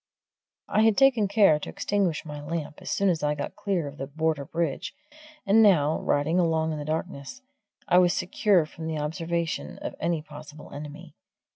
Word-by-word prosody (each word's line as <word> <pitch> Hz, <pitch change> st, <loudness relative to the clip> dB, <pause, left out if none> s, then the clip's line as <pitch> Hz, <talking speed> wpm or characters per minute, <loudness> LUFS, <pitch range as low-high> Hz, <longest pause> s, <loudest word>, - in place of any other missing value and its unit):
I 215 Hz, -, +2 dB
had 220 Hz, -2 st, +4 dB
taken 255 Hz, -7 st, +4 dB
care 195 Hz, -7 st, +4 dB
to -, -, -7 dB
extinguish 195 Hz, -7 st, -1 dB
my 150 Hz, -1 st, -7 dB
lamp 155 Hz, -1 st, -5 dB
as -, -, -7 dB
soon 200 Hz, -, +1 dB
as 170 Hz, -4 st, +1 dB
I 150 Hz, 0 st, 0 dB
got 145 Hz, -, -5 dB
clear 185 Hz, -7 st, -1 dB
of 140 Hz, +1 st, -9 dB
the 135 Hz, -, -4 dB
Border 155 Hz, -1 st, -1 dB
Bridge, 165 Hz, -, -3 dB, 0.5 s
and 210 Hz, +3 st, +5 dB
now, 160 Hz, -8 st, +4 dB
riding 155 Hz, +5 st, +1 dB
along 160 Hz, -2 st, +1 dB
in 155 Hz, -, -4 dB
the 145 Hz, -, -5 dB
darkness, 155 Hz, -, -5 dB, 0.4 s
I 180 Hz, -, +5 dB
was 180 Hz, -1 st, +4 dB
secure 180 Hz, -1 st, +2 dB
from 160 Hz, +1 st, -8 dB
the 160 Hz, -1 st, -2 dB
observation 165 Hz, +2 st, -3 dB
of -, -, -6 dB
any 165 Hz, -2 st, -1 dB
possible 150 Hz, 0 st, -12 dB
enemy. 145 Hz, +1 st, -9 dB
160 Hz, 180 wpm, -26 LUFS, 150-185 Hz, 0.5 s, and